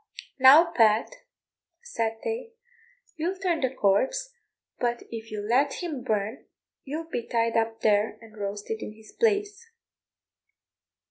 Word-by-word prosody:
"Now, 295 +6 +8
Pat," 220 - +3 0.7
said 225 - -2
they, 460 +1 -4 0.6
"you'll 350 +4 -2
turn 360 -4 0
the 260 - +2
corpse, 265 - +1 0.5
but 240 -1 -1
if 225 -1 -7
you 210 -1 -4
let 270 +4 +3
him 305 -7 -5
burn 215 0 -2 0.4
you'll 310 +4 -5
be 245 -8 -4
tied 230 -1 0
up 225 0 0
there 210 0 +2
and 225 -2 -16
roasted 205 +1 -4
in 210 - -6
his 220 0 -16
place." 410 -1 0
240 Hz, 130 wpm, -27 LUFS, 220-335 Hz, 0.7 s, Now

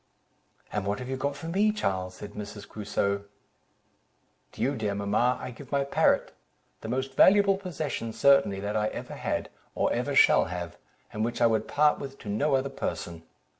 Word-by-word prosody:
"And 105 -2 -2
what 100 +1 0
have 125 0 -7
you 135 - -1
got 140 +2 -2
for 145 +3 -8
me, 200 +5 +2
Charles?" 95 - -2
said 105 - -9
Mrs. 105 0 -8
Crusoe. 100 -1 -2 1.3
"To - - -9
you, 140 +3 +1
dear 105 -4 -2
mamma, 105 +5 +1
I - - -6
give 130 +2 -12
my 140 -1 +2
parrot, 140 - +2 0.5
the 110 - -7
most 130 +2 -2
valuable 200 +6 +6
possession 155 - -4
certainly 140 -6 +4
that 100 +1 -3
I 105 0 +1
ever - - -6
had, - - -3 0.3
or - - +1
ever - - -1
shall - - +6
have, 85 -2 -5 0.4
and 110 - -1
which 120 +1 -2
I 120 - +5
would 110 -2 +2
part 150 0 +3
with 135 0 -7
to 105 - -9
no 140 +8 +1
other 135 +1 0
person. 85 -8 -4
120 Hz, 185 wpm, -28 LUFS, 100-140 Hz, 1.3 s, valuable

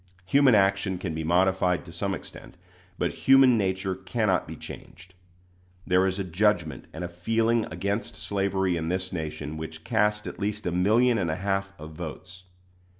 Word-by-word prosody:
Human 130 +4 +5
action 95 -1 +2
can 90 -2 -4
be 80 0 -3
modified 90 +1 +2
to 85 - -11
some 95 +3 -2
extent, 90 - -12 0.4
but - - -1 0.2
human 135 -2 +8
nature 95 -2 0
cannot 95 0 0
be - - -7
changed. 90 +1 -11 0.7
There 90 +1 +3
is 95 0 -1
a 100 - -1
judgment 85 -5 0
and - - -6
a - - -2
feeling 115 +6 +1
against 100 +7 -3
slavery 95 -3 0
in 80 0 -3
this 95 +1 -2
nation 80 -2 -5
which 80 0 -7
cast 105 +3 +1
at - - -7
least 105 +1 -2
a 90 - 0
million 110 +7 +3
and 90 -4 0
a 80 - 0
half 95 +1 -2
of 80 +1 -9
votes. 90 +3 -8
95 Hz, 170 wpm, -26 LUFS, 85-105 Hz, 0.7 s, human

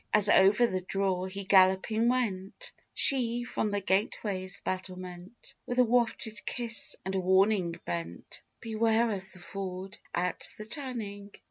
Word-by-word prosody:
As 210 -1 +5
over 205 +6 +5
the 185 -5 -2
draw 185 0 -1
he 195 +1 -6
galloping 190 +4 +3
went, 240 - -2 0.2
She, 240 -3 +4
from 220 -3 -2
the 205 0 -2
gateway's 190 0 -1
battlement, 185 +2 -7
With 245 - -3
a 250 - +6
wafted 230 -2 0
kiss 235 -2 +2
and 190 - -3
a 190 - 0
warning 190 -1 +2
bent 85 0 -6 0.2
"Beware 225 0 +1
of 190 -2 -6
the - - -14
ford 190 +1 -7 0.2
at 180 +1 -2
the 215 - -8
turning!" 215 -6 -7
200 Hz, 140 wpm, -29 LUFS, 185-230 Hz, 0.2 s, a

